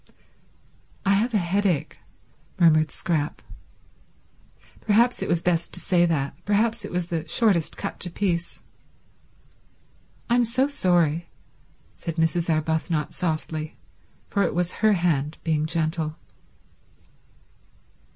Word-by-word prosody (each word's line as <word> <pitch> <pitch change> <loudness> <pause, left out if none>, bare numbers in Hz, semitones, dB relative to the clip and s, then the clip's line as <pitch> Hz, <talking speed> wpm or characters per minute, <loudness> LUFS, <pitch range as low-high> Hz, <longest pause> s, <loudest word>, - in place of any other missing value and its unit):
"I 195 - +4
have 225 +4 +1
a - - +6
headache," 185 -3 0 0.6
murmured 155 -3 +5
Scrap. 150 0 -2 1.4
Perhaps 235 +4 +2
it - - -2
was 170 -1 +1
best 170 -1 0
to - - -5
say 175 -1 +3
that; 140 -4 -1
perhaps 220 +3 +1
it - - -6
was 180 -1 -1
the 165 -2 -3
shortest 200 -9 +2
cut - - -5
to 180 - -2
peace. 170 -2 -2 1.6
"I'm 245 0 +3
so 240 +3 +1
sorry," 175 - +1 0.7
said 165 - -5
Mrs. 165 +1 +1
Arbuthnot 160 0 0
softly, 155 -2 -3 0.5
for 200 - 0
it 180 - 0
was 180 0 0
her 215 -1 +5
hand 160 -5 0
being 155 -2 0
gentle. 160 -1 -1
170 Hz, 115 wpm, -25 LUFS, 160-200 Hz, 1.6 s, a